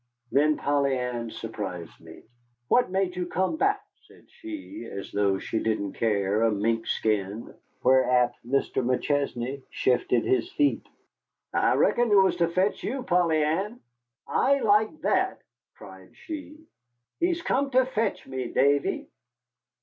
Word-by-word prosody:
Then 150 Hz, +4 st, +3 dB
Polly 140 Hz, -2 st, +1 dB
Ann 120 Hz, -2 st, -3 dB
surprised 100 Hz, -7 st, -6 dB
me. 80 Hz, -1 st, -14 dB, 0.5 s
"What 245 Hz, -, +4 dB
made 190 Hz, -1 st, -1 dB
you 180 Hz, -1 st, -3 dB
come 190 Hz, -, 0 dB
back?" 405 Hz, +3 st, +1 dB, 0.2 s
said -, -, -20 dB
she, 320 Hz, -1 st, -8 dB
as 100 Hz, -, -7 dB
though 100 Hz, -1 st, +1 dB
she 110 Hz, -, -3 dB
didn't 110 Hz, -3 st, -1 dB
care 105 Hz, -2 st, 0 dB
a 115 Hz, -, +4 dB
minkskin. 110 Hz, -1 st, -1 dB, 0.3 s
Whereat 125 Hz, -1 st, +4 dB
Mr. 130 Hz, +1 st, 0 dB
McChesney 135 Hz, 0 st, -1 dB
shifted 125 Hz, -2 st, +1 dB
his 130 Hz, -, +1 dB
feet. 290 Hz, -1 st, +1 dB, 0.7 s
"I -, -, +3 dB
reckon 240 Hz, -1 st, +3 dB
it 205 Hz, -, +4 dB
was 190 Hz, -2 st, +4 dB
to 170 Hz, -1 st, +2 dB
fetch 185 Hz, +4 st, 0 dB
you, 260 Hz, +3 st, -3 dB
Polly 175 Hz, -6 st, +2 dB
Ann." 195 Hz, +10 st, -1 dB, 0.5 s
"I 280 Hz, +1 st, +3 dB
like 215 Hz, +8 st, +2 dB
that!" -, -, 0 dB, 0.3 s
cried -, -, -14 dB
she. 305 Hz, -2 st, -8 dB, 0.6 s
"He's 345 Hz, -1 st, 0 dB
come 280 Hz, -2 st, +1 dB
to 260 Hz, -1 st, +3 dB
fetch 225 Hz, -5 st, -2 dB
me, 130 Hz, -2 st, -4 dB
Davy." 140 Hz, +2 st, +1 dB
140 Hz, 135 wpm, -26 LUFS, -, 0.7 s, What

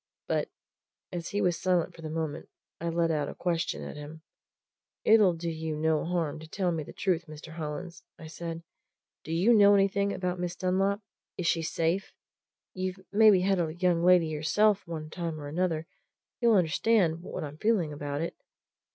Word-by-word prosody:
But, -, -, 0 dB, 0.6 s
as 170 Hz, -2 st, -4 dB
he 205 Hz, -, -1 dB
was 175 Hz, -2 st, +1 dB
silent 180 Hz, -3 st, +1 dB
for 165 Hz, -, -12 dB
the 155 Hz, -, -5 dB
moment, 160 Hz, -1 st, -4 dB, 0.3 s
I 170 Hz, -, -2 dB
let 165 Hz, 0 st, +1 dB
out 150 Hz, -2 st, -1 dB
a -, -, -8 dB
question 170 Hz, -2 st, -1 dB
at -, -, -7 dB
him. 150 Hz, +2 st, -9 dB, 0.8 s
"It'll 210 Hz, -5 st, +5 dB
do 165 Hz, +1 st, -5 dB
you 160 Hz, -1 st, -3 dB
no 155 Hz, 0 st, +1 dB
harm 165 Hz, -4 st, -1 dB
to 160 Hz, -, -10 dB
tell 180 Hz, +2 st, -1 dB
me 165 Hz, -2 st, -2 dB
the 145 Hz, -, -8 dB
truth, 175 Hz, -4 st, 0 dB
Mr. 155 Hz, +1 st, -10 dB
Hollins," 165 Hz, +2 st, -6 dB, 0.2 s
I 160 Hz, -, -11 dB
said. 165 Hz, +1 st, -6 dB, 0.6 s
"Do 160 Hz, -, -7 dB
you 180 Hz, +9 st, +4 dB
know 205 Hz, -2 st, +7 dB
anything 200 Hz, 0 st, +2 dB
about 180 Hz, -2 st, -2 dB
Miss 175 Hz, 0 st, -3 dB
Dunlop? 195 Hz, +3 st, +1 dB, 0.4 s
Is 180 Hz, -, -3 dB
she 165 Hz, 0 st, +2 dB
safe? 165 Hz, +4 st, -1 dB, 0.6 s
You've 185 Hz, 0 st, -3 dB
maybe 210 Hz, -2 st, +6 dB
had 190 Hz, 0 st, +2 dB
a 160 Hz, -2 st, -1 dB
young 175 Hz, -1 st, +2 dB
lady 180 Hz, -1 st, +6 dB
yourself 185 Hz, +7 st, +2 dB
one 155 Hz, -2 st, -6 dB
time 165 Hz, -3 st, -4 dB
or 145 Hz, -, -7 dB
another 165 Hz, 0 st, -1 dB, 0.5 s
you'll 235 Hz, -2 st, +4 dB
understand 180 Hz, -1 st, +2 dB
what 175 Hz, -, -6 dB
I'm 150 Hz, +1 st, -8 dB
feeling 200 Hz, -9 st, +1 dB
about 145 Hz, 0 st, -4 dB
it?" 165 Hz, -, -3 dB
170 Hz, 180 wpm, -29 LUFS, 160-185 Hz, 0.8 s, know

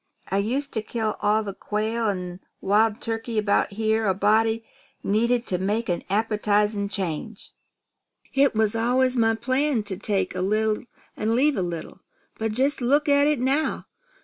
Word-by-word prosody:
I 195 Hz, -, +2 dB
used 265 Hz, +8 st, -2 dB
to 220 Hz, -, -1 dB
kill 220 Hz, -1 st, -2 dB
all 210 Hz, +1 st, +2 dB
the 200 Hz, -2 st, -5 dB
quail 220 Hz, +3 st, -1 dB
an' 180 Hz, -2 st, -4 dB, 0.2 s
wild 210 Hz, +2 st, +2 dB
turkeys 225 Hz, 0 st, -3 dB
about 205 Hz, -1 st, +1 dB
here 220 Hz, +1 st, +1 dB
a 190 Hz, -, +2 dB
body 220 Hz, +3 st, +2 dB, 0.4 s
needed 235 Hz, +4 st, +1 dB
to 180 Hz, -, -1 dB
make 210 Hz, +4 st, -1 dB
an 175 Hz, -, -1 dB
appetizing 210 Hz, -1 st, +1 dB
change, 195 Hz, +2 st, -4 dB, 0.8 s
It 275 Hz, -3 st, +3 dB
was 220 Hz, 0 st, +2 dB
always 250 Hz, +3 st, +2 dB
my 225 Hz, -2 st, +3 dB
plan 255 Hz, +1 st, 0 dB
to 200 Hz, -3 st, -5 dB
take 200 Hz, -1 st, -1 dB
a 185 Hz, -, -3 dB
little 215 Hz, +4 st, 0 dB, 0.3 s
an' 220 Hz, +2 st, 0 dB
leave 285 Hz, +3 st, +3 dB
a 190 Hz, -, -1 dB
little. 175 Hz, +1 st, -5 dB, 0.4 s
But 220 Hz, -1 st, -1 dB
jest 270 Hz, +4 st, +1 dB
look 285 Hz, +5 st, +2 dB
at 285 Hz, 0 st, +4 dB
it 300 Hz, -3 st, +1 dB
now. 275 Hz, +5 st, 0 dB
220 Hz, 165 wpm, -24 LUFS, 205-240 Hz, 0.8 s, at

